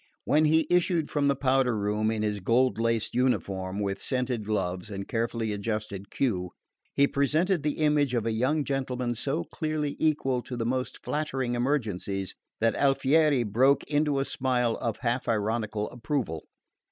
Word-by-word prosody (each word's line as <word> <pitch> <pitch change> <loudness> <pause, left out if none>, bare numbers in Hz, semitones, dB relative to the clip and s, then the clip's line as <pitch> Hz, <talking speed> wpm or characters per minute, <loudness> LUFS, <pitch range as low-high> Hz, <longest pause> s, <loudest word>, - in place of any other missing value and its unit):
When 155 +2 +4
he 160 +1 +4
issued 175 -3 +1
from 145 -2 +1
the 140 - +3
powder 130 -3 +2
room 105 +1 0
in 110 -1 -1
his 105 -1 -1
gold 120 +5 +2
laced 115 -1 0
uniform, 100 -7 0
with 100 -1 -2
scented 125 -3 -1
gloves 95 -3 -2
and 100 -1 -5
carefully 115 -1 -1
adjusted 105 -2 -4
queue, 90 -9 -1 0.4
he 140 - +5
presented 155 +6 +1
the 150 0 -1
image 150 -4 +2
of 115 -2 0
a 115 - +1
young 130 +7 +1
gentleman 130 -3 -2
so 140 +7 -2
clearly 155 -2 -3
equal 135 -5 +1
to 125 0 -7
the 115 - -2
most 130 +2 -2
flattering 135 -5 -1
emergencies 110 -7 -1 0.3
that 115 +1 +2
Alfieri 140 0 +3
broke 125 +6 +3
into 145 -1 +1
a 135 - +1
smile 125 -4 0
of 115 -2 -2
half 120 +1 -1
ironical 110 -1 -1
approval. 115 - -3
125 Hz, 160 wpm, -27 LUFS, 110-140 Hz, 0.4 s, he